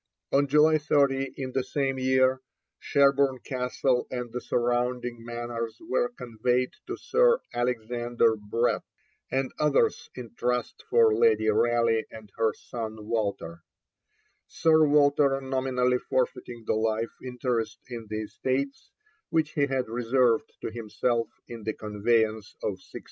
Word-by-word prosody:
On 140 +1 +3
July 150 +2 +5
30 135 -2 +1
in 130 -1 -4
the 130 0 0
same 135 0 -1
year, 130 0 +3 0.4
Sherborne 140 -1 +3
Castle 125 0 -1
and 125 -2 -4
the 125 - -3
surrounding 120 0 -1
manors 120 -1 -5
were 245 +8 0
conveyed 125 +2 0 0.2
to - - -4
Sir 485 0 +3
Alexander 120 -1 0
Brett 110 +3 0 0.5
and 135 0 -1
others 150 -2 +2
in 120 -3 -8
trust 125 +1 -2
for 455 -2 +5
Lady 455 0 +3
Raleigh 115 -1 +2
and 110 -2 -12
her 115 -1 +2
son 110 -1 -7
Walter, 100 -7 -2 0.9
Sir 160 -1 +4
Walter 145 -1 +4
nominally 130 -2 0
forfeiting 120 -2 -2
the - - +1
life 110 +1 0
interest 125 -3 -2
in 115 -3 -7
the 110 0 -3
estates 130 +6 -3 0.4
which 160 -2 +1
he 145 -1 +1
had 130 -3 -1
reserved 120 0 +1
to - - -4
himself 115 +1 -1 0.2
in 115 -1 -8
the 110 +1 -2
conveyance 110 0 0
of - - +1
1602. - - -10
125 Hz, 130 wpm, -27 LUFS, 115-135 Hz, 0.9 s, July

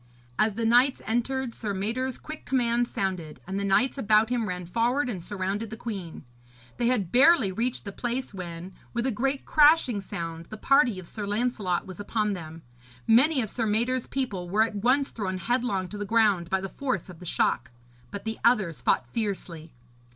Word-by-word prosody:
As 215 -2 +3
the 230 +1 -1
knights 245 +4 +4
entered, 240 +2 -1
Sir 205 -3 -4
Mador's 235 +6 -2
quick 310 0 -8
commands 240 -2 +1
sounded, 185 -5 -3
and 190 +1 -3
the - - -2
knights 250 +8 +2
about 215 -1 +4
him 235 -5 0
ran 180 -1 -4
forward 240 +9 +1
and 200 -8 -4
surrounded 200 +4 -3
the 220 - -7
queen. 195 -10 -6 0.5
They 235 - +1
had 210 -8 +1
barely 260 - +5
reached 235 +6 -2
the 200 - -4
place 245 +4 -3
when, 180 0 -7 0.2
with 235 +1 0
a 265 - +1
great 270 +5 -1
crashing 295 -8 +4
sound, 165 -3 -6
the 215 - -8
party 255 -3 +3
of 185 - -8
Sir 205 +3 -5
Lancelot 205 -4 -1
was 185 -1 -10
upon 210 0 -1
them. 165 -3 -8 0.4
Many 260 +4 +4
of 215 - -5
Sir 225 -3 -1
Mador's 235 +4 0
people 200 -10 -3
were 210 +4 +4
at 225 -2 -3
once 255 +6 +2
thrown 190 -4 -3
headlong 235 -3 -1
to 210 - -7
the - - -1
ground 205 -5 +2
by 190 0 +1
the 195 - -3
force 200 - -3
of 180 -3 -12
the 180 - -10
shock; - - 0 0.4
but 200 - -7
the 220 0 -4
others 195 - +2
fought 125 +1 +2
fiercely. 175 - -4
215 Hz, 190 wpm, -27 LUFS, 190-245 Hz, 0.5 s, barely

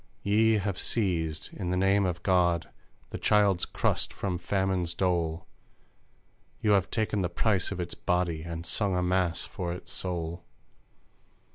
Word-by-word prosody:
Ye 110 +2 +4
have 100 -3 -1
seized, 85 -8 -1
in 90 -4 -4
the 90 - 0
name 95 +1 +3
of 90 -1 -4
God, 85 -3 +2 0.4
the - - -5
Child's 100 -4 +3
crust - - 0
from 90 -3 -3
famine's 95 -2 0
dole; 85 -3 0 1.1
You 105 - +2
have 100 -3 +3
taken 110 -3 0
the 90 - 0
price 95 +2 +1
of 100 - -4
its 85 -1 -4
body 90 -3 0
And 85 0 -6
sung 100 0 +1
a 90 - +1
mass 90 -2 +1
for 90 -2 -4
its 90 - -7
soul! 85 -1 -3
90 Hz, 150 wpm, -29 LUFS, 85-100 Hz, 1.1 s, Ye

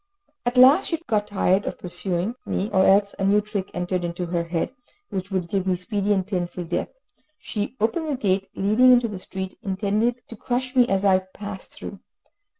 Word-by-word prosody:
At 245 +1 0
last 270 +9 +7
she 330 - 0
got 210 -4 0
tired 195 -1 +1
of - - -3
pursuing 180 +3 -3
me, 205 +3 -2
or 190 -1 +4
else 200 +1 +4
a - - -1
new 200 +2 +4
trick 210 -2 -4
entered 180 0 -2
into 175 +1 -3
her 170 -1 -1
head, 170 +7 -2 0.4
which 190 -1 -4
would 185 -3 -1
give 190 +1 -1
me 185 - +2
speedy 200 +2 -2
and 190 -2 +2
painful 180 -2 -3
death; 175 +1 -2 0.5
she 215 +4 -4
opened 305 +9 0
the 290 - 0
gate 195 -4 0
leading 215 +6 +5
into 245 -1 +5
the 205 -4 -6
street, 190 0 -6
intending 210 +3 0
to 230 - -9
crush 250 +3 -3
me 250 -2 +5
as 195 +1 +1
I 190 -1 +5
passed 190 +1 -9
through. - - -8
195 Hz, 195 wpm, -24 LUFS, 185-220 Hz, 0.5 s, last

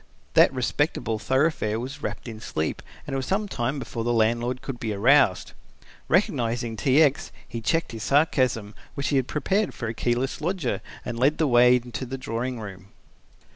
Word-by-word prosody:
That - - +6
respectable 110 -1 -1
thoroughfare 130 -2 +1
was 135 +4 -6
wrapped - - -5
in 110 -2 -7
sleep 80 -8 -3 0.2
and - - -6
it - - 0
was 130 - -3
some 205 +2 0
time 135 -4 -2
before 120 -4 -4
the 120 - 0
landlord 120 +2 +1
could 130 -3 -5
be 110 -2 -2
aroused. 120 0 +3 0.6
Recognizing 115 -1 +1
T. 135 +7 +4
X. 145 -2 0 0.2
he 115 -1 -6
checked 165 +9 0
his 115 -1 -7
sarcasm, 130 -7 +1 0.2
which 140 - -2
he 140 - +2
had 130 -1 +1
prepared 195 +6 0
for 120 - -4
a 110 - -3
keyless 120 +3 -1
lodger, 170 -5 -1 0.2
and 120 -1 -4
led 140 +4 +3
the 160 - +2
way 125 -2 +6
into 125 +1 -4
the 135 +2 -5
drawing 125 0 -3
room. 95 -3 -9
125 Hz, 180 wpm, -25 LUFS, 115-140 Hz, 0.6 s, That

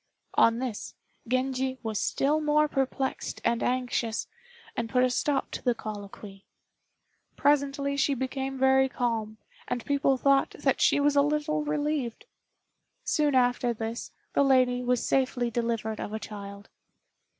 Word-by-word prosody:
On 230 0 +4
this, 245 -4 -5 0.3
Genji 260 +1 0
was 220 -2 -2
still 295 +3 +1
more 300 0 +3
perplexed 270 -1 -2
and 235 0 +1
anxious, 245 -3 -1 0.5
and 230 -1 -2
put 250 +1 +3
a 255 - +2
stop 275 +2 0
to - - -5
the 245 -2 +2
colloquy. 205 -2 -8 0.9
Presently 280 -1 +1
she 280 0 +2
became 265 +1 -3
very 265 0 +4
calm, 225 -4 -2 0.3
and 245 -2 -3
people 280 -1 +2
thought 275 +1 +2
that - - +1
she - - +4
was 290 0 +3
a 285 - +6
little 300 +1 0
relieved. 295 - -2 0.8
Soon 295 -3 +1
after 245 -1 +2
this, 225 +1 -4 0.2
the - - +3
lady 255 -2 +3
was 250 -1 +1
safely 255 -3 +1
delivered 230 -2 -2
of 210 - -5
a 220 - -2
child. 200 -1 -9
255 Hz, 140 wpm, -28 LUFS, 230-280 Hz, 0.9 s, a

